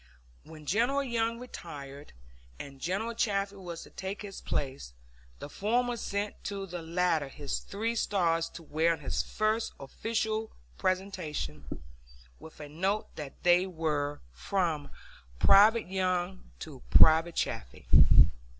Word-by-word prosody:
When 155 -1 -12
General 240 - +2
Young 230 -2 -1
retired 145 - -9 0.5
and 135 -1 -10
General 200 +7 -1
Chaffee 200 -3 -1
was 175 -3 -7
to - - -15
take 195 +2 -5
his 195 -2 -8
place, 130 - -3 0.4
the - - -7
former 240 +9 0
sent 205 -2 -4
to 200 -1 -3
the 175 -2 -6
latter 165 -2 +1
his 140 +1 -4
three 225 +3 -3
stars 165 -6 +1
to 170 - -8
wear 160 +2 +2
on 160 - -7
his 140 - -1
first 215 +1 -1
official 220 +8 -2 0.3
presentation, 165 - -3 0.6
with 160 - -13
a 150 - -7
note 190 +8 -2
that 145 -3 -9
they 180 +1 +5
were 150 -4 -2
from 165 - -1 0.5
"Private 210 - +6
Young 185 0 -1 0.2
to 140 -5 -8
Private 160 +1 +6
Chaffee." - - -3
180 Hz, 130 wpm, -30 LUFS, 155-205 Hz, 0.6 s, Private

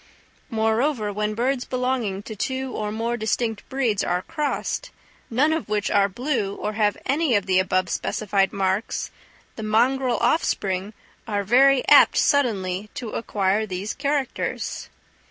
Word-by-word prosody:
Moreover, 225 0 0
when 210 +1 -2
birds 250 +2 0
belonging 250 -7 -2
to 220 - -7
two 260 +4 -3
or 210 -3 -3
more 230 +2 -2
distinct 220 0 -2
breeds 245 -7 0
are 180 +1 -1
crossed, 325 - -3 0.4
none 285 +7 +2
of 320 -8 -3
which 210 -1 0
are 200 -1 +3
blue 225 -2 -2
or 210 - -3
have 210 -1 +1
any 280 -2 +2
of 200 -2 +1
the 185 -1 +3
above 185 0 +1
specified 195 +1 0
marks, 195 +1 -1 0.5
the - - -5
mongrel 245 +4 +2
offspring 205 - 0 0.3
are 205 -2 -1
very 260 +5 +4
apt - - +7
suddenly 210 -8 +1
to 230 -4 -5
acquire 205 -1 0
these 190 +2 -4
characters. 280 -2 -2
220 Hz, 140 wpm, -23 LUFS, 200-260 Hz, 0.5 s, apt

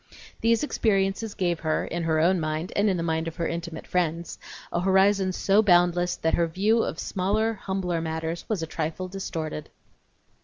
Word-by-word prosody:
These 230 +3 +2
experiences 205 -4 0
gave 175 -4 0
her, 155 -1 0
in 170 - -3
her 160 -1 +2
own 180 +3 +3
mind, 155 +2 -3
and 205 +1 +3
in 185 - +1
the 165 - -2
mind 160 0 -1
of 165 - -5
her 170 - -1
intimate 170 -1 -5
friends, 170 -1 -1 0.3
a - - +1
horizon 190 +1 +3
so 195 +3 +3
boundless 175 -2 +3
that 160 - -1
her 170 - +2
view 210 +7 +2
of 160 - -3
smaller, 210 +6 0
humbler 190 -4 -2
matters 160 +1 -3
was 205 -7 -1
a - - -1
trifle 160 +3 -3
distorted. 165 -5 -5
175 Hz, 180 wpm, -26 LUFS, 165-195 Hz, 0.3 s, own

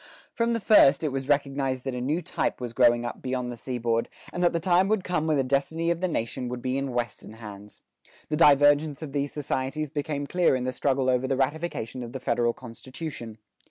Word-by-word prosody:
From 235 0 +1
the 230 - 0
first, 160 -10 +5
it 155 - +1
was 135 0 -3
recognized 135 -2 0
that 135 - -3
a 125 - -3
new 150 +7 -1
type - - -2
was 120 -2 -5
growing 120 -1 +4
up - - -5
beyond 125 -1 -2
the - - -6
seaboard, 115 -1 -2 0.2
and 175 - -1
that 175 - +4
the 170 - -1
time 180 +2 +3
would 215 -2 +1
come 175 -3 -1
when 155 -2 +2
the 135 - +2
destiny 150 +6 0
of 170 0 -2
the 185 - +1
nation 125 -4 -3
would 125 0 -4
be 130 +1 -2
in 135 -1 -2
Western 120 -2 -4
hands. 105 -2 -11 0.5
The 155 - 0
divergence 145 0 +4
of 150 - -6
these 140 0 -1
societies 145 0 -3
became 145 -1 -3
clear 175 -2 +2
in 130 - -2
the 130 0 -2
struggle 135 0 0
over 130 0 +2
the 135 0 0
ratification 135 -4 -2
of 120 -1 -7
the 130 - -4
federal 120 -1 +1
constitution. 125 -1 -8
135 Hz, 220 wpm, -26 LUFS, 125-155 Hz, 0.5 s, first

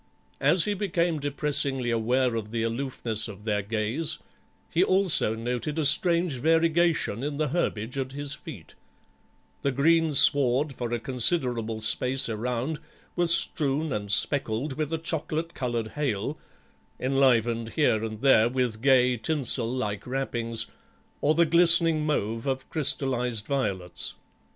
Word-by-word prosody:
As 160 +5 +3
he 210 - 0
became 175 -5 -1
depressingly 140 -3 0
aware 120 +2 +1
of 110 -2 -4
the 115 0 -2
aloofness 115 -2 -1
of 105 -1 -11
their 105 -2 -1
gaze 110 +9 -3 0.5
he 175 - +3
also 185 - +2
noted 125 +6 -4
a 155 - 0
strange 170 -1 +3
variegation 165 -4 +1
in 145 +1 -4
the 155 -1 -1
herbage 130 -5 -2
at 130 -1 -4
his 145 0 -3
feet; 150 - -11 0.9
the 140 - 0
greensward 145 -2 +3
for 120 -2 -5
a 120 - -1
considerable 120 -3 0
space 125 +4 +1
around 125 +6 -3 0.4
was 175 -1 +3
strewn 155 -3 +1
and 105 -1 -4
speckled 130 +3 +2
with 155 +2 -4
a 165 - -1
chocolate 160 0 -4
coloured 120 -3 -3
hail, 135 -1 -3 0.6
enlivened 120 -4 +1
here 115 -8 +1
and 110 -1 -6
there 120 -4 +4
with 125 -3 -2
gay 125 -2 +3
tinsel 125 -2 0
like 105 -5 -4
wrappings 120 -3 -2 0.6
or 150 +2 +2
the 170 +1 +4
glistening 165 -1 +5
mauve 115 -4 -2
of 130 -1 -3
crystallised 125 -7 0
violets. 100 -11 -3
130 Hz, 135 wpm, -26 LUFS, 115-155 Hz, 0.9 s, glistening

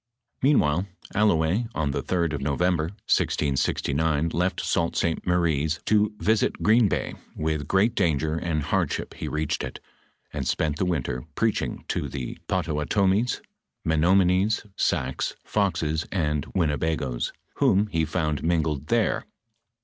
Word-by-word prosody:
"f - - -26
Meanwhile 90 - +3 0.3
Allouez, 100 +1 +2
on 75 -2 0
the - - -2
3d 85 -4 0
of 70 - -3
November, 80 +4 +1
1669, 80 -3 0
left 90 +3 0
Sault 85 -1 0
St. 85 +1 -1
Mary's 80 -3 +1
to 105 0 +3
visit 110 +1 +1
Green 110 +1 +5
bay; - - -2 0.2
with 75 -2 -2
great 100 +7 +3
danger 80 -6 +1
and 80 -2 -1
hardship - - -1
he - - -6
reached 75 -1 -1
it, - - -6 0.5
And - - -3
spent 75 -2 0
the 95 - 0
winter 65 -7 -2
preaching 115 -2 -1
to - - -1
the 65 -4 -5
Pottawatoraies, 95 +9 +1 0.4
Menomonees, 90 +6 +3
Sacs, 65 -7 -1
Foxes, 85 -6 0
and 75 -5 0
Winnebagoes, 75 -7 0 0.3
whom 100 +2 +4
he 85 -6 0
found 75 -2 -1
mingled 80 -4 0
there. 115 +1 +1
80 Hz, 130 wpm, -25 LUFS, 75-95 Hz, 0.5 s, Green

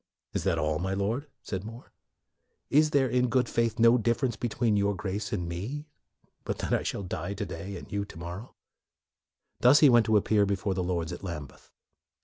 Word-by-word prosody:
'' - - -62
" - - -59
Is - - -2
that - - +2
all, 75 0 0
my 95 +2 -1
Lord?" 110 +9 -1 0.2
said 95 -1 -4
More. 115 +3 -10 0.4
" - - -52 0.3
Is 150 +2 +5
there, 140 -3 +3
in 125 0 +1
good 125 +1 +2
faith, 115 -1 0
no 115 0 +6
more 125 - +4
differ 115 +4 +1
ence 120 -3 -1
between 115 -1 0
your 100 0 +1
Grace 105 +2 -4
and 90 -6 -2
me, 110 - -5 0.6
but - - -3
that - - -2
I - - +2
shall 100 - -3
die 100 +1 -4
to - - -3
day 95 +4 -6
and - - -11
you 100 0 -1
to 100 - -12
morrow?" 85 +7 -8 1.0
Thus 130 +5 +6
he 150 - +8
went 120 -2 +5
to 110 -1 +5
appear 105 0 +3
before 100 0 -1
the 95 - -2
Lords 85 -2 -2
at - - -8
Lambeth. 75 -7 -7
105 Hz, 220 wpm, -28 LUFS, 95-120 Hz, 1.0 s, he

